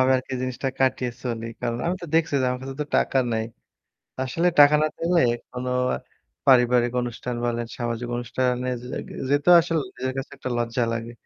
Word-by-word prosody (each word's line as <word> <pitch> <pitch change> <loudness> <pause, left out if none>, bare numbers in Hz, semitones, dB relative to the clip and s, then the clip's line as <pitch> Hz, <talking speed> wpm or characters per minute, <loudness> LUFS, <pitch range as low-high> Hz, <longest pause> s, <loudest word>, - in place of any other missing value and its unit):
আমি 130 0 +4
আরকি 130 +1 -6
জিনিসটা 130 +1 -2
কাটিয়ে 130 -2 +1
চলি। 115 -2 -3
কারণ 120 -1 -2
আমি 180 +2 0
তো - - -5
দেখছি 165 -3 +2
যে - - +1
আমার 125 0 -3
কাছে 135 0 -6
তো - - -8
টাকা 135 - +2
নাই। 110 0 0 0.8
আসলে 165 +7 +1
টাকা 145 +1 +8
না - - +4
পেলে 170 0 +2 0.3
কোনো 125 0 -4 0.8
পারিবারিক 125 -2 +5
অনুষ্ঠান 120 0 -4
বলেন 120 -1 -1
সামাজিক 120 0 -3
অনুষ্ঠানে 125 +1 -1
যে 125 - -9 0.4
যেতেও 145 +5 +5
আসলে 165 -1 -1 0.2
নিজের 130 +1 -2
কাছে 135 - -5
একটা 130 - -5
লজ্জা 120 +1 0
লাগে। 115 +1 -4
125 Hz, 175 wpm, -24 LUFS, 120-135 Hz, 0.8 s, টাকা